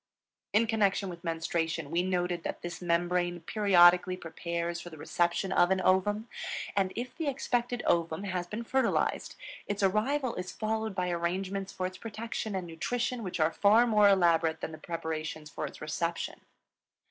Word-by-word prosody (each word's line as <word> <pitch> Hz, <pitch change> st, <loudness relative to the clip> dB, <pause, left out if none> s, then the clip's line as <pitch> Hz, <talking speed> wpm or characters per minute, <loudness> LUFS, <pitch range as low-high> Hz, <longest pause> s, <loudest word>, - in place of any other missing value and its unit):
In 220 Hz, +3 st, +4 dB
connection 205 Hz, -3 st, +1 dB
with 170 Hz, -1 st, -9 dB
menstruation 165 Hz, -2 st, -2 dB
we 170 Hz, +1 st, +2 dB
noted 180 Hz, -1 st, -1 dB
that -, -, -5 dB
this 175 Hz, 0 st, -6 dB
membrane 175 Hz, 0 st, 0 dB
periodically 180 Hz, -1 st, +5 dB
prepares 170 Hz, 0 st, -4 dB
for 175 Hz, -, -8 dB
the 160 Hz, -, -11 dB
reception 175 Hz, +4 st, 0 dB
of 175 Hz, -1 st, +4 dB
an 190 Hz, 0 st, +2 dB
ovum. 205 Hz, +4 st, +2 dB, 0.5 s
And 195 Hz, -2 st, +2 dB
if 250 Hz, +1 st, -5 dB
the 320 Hz, -, -3 dB
expected 245 Hz, -3 st, -1 dB
ovum 165 Hz, +1 st, +1 dB
has 185 Hz, -3 st, -2 dB
been 215 Hz, +6 st, -5 dB
fertilized, 265 Hz, +3 st, 0 dB, 0.3 s
its 205 Hz, 0 st, -2 dB
arrival 235 Hz, +7 st, +1 dB
is 180 Hz, 0 st, -4 dB
followed 220 Hz, -1 st, -2 dB
by 180 Hz, -2 st, 0 dB
arrangements 190 Hz, +3 st, -2 dB
for 185 Hz, -, -3 dB
its 185 Hz, 0 st, -5 dB
protection 220 Hz, -1 st, -4 dB
and 185 Hz, -2 st, -2 dB
nutrition 240 Hz, +9 st, -2 dB
which 185 Hz, -4 st, -4 dB
are 155 Hz, +1 st, +3 dB
far 215 Hz, +4 st, +5 dB
more 210 Hz, -3 st, +5 dB
elaborate 170 Hz, -4 st, +3 dB
than -, -, -4 dB
the 155 Hz, -, -9 dB
preparations 155 Hz, -2 st, -4 dB
for 150 Hz, -, -3 dB
its -, -, -12 dB
reception. 170 Hz, +2 st, -3 dB
185 Hz, 165 wpm, -30 LUFS, 170-210 Hz, 0.5 s, periodically